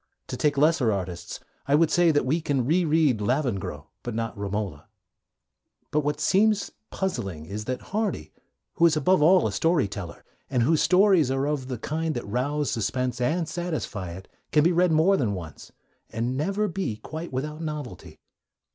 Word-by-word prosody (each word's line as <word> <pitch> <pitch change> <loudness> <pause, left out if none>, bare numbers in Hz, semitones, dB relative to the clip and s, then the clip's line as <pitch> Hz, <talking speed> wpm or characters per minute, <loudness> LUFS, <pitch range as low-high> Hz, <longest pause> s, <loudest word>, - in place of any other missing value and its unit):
To - - -3
take 145 -2 +1
lesser 145 -5 +3
artists, 90 -3 -4 0.3
I 140 - +4
would 160 0 +3
say 175 +1 +4
that 145 -4 +2
we 155 +6 +1
can 135 -5 0
re 170 +6 +2
read 150 -8 +2
Lavengro 120 -3 -1 0.2
but 120 -2 -5
not 115 0 -3
Romola. 100 -6 -4 1.0
But 150 - +2
what 150 0 -1
seems 210 +1 +2 0.2
puzzling 95 - -3
is 105 +5 -6
that 130 +1 -4
Hardy, 215 0 -2 0.4
who 170 - +6
is 160 -2 +1
above 180 +1 +3
all 180 +4 +5
a - - 0
story 165 - +2
teller, 100 -4 -8 0.2
and 125 -3 +1
whose 155 +5 +3
stories 185 -6 +4
are 135 +1 0
of 145 -3 -2
the 130 -2 -4
kind 155 +6 -2
that 120 - -4
rouse 140 +6 -1
suspense 125 +3 -2
and 160 +6 0
satisfy 155 - -4
it, 95 +2 -10 0.2
can 150 -1 +4
be 170 - +4
read 175 0 +3
more 165 +5 +4
than 110 - 0
once, 85 -4 -9 0.4
and 120 +3 -2
never 195 +9 0
be 190 - -3
quite 160 +9 -7
without 150 +4 -4
novelty. 150 -5 -6
145 Hz, 175 wpm, -26 LUFS, 115-165 Hz, 1.0 s, who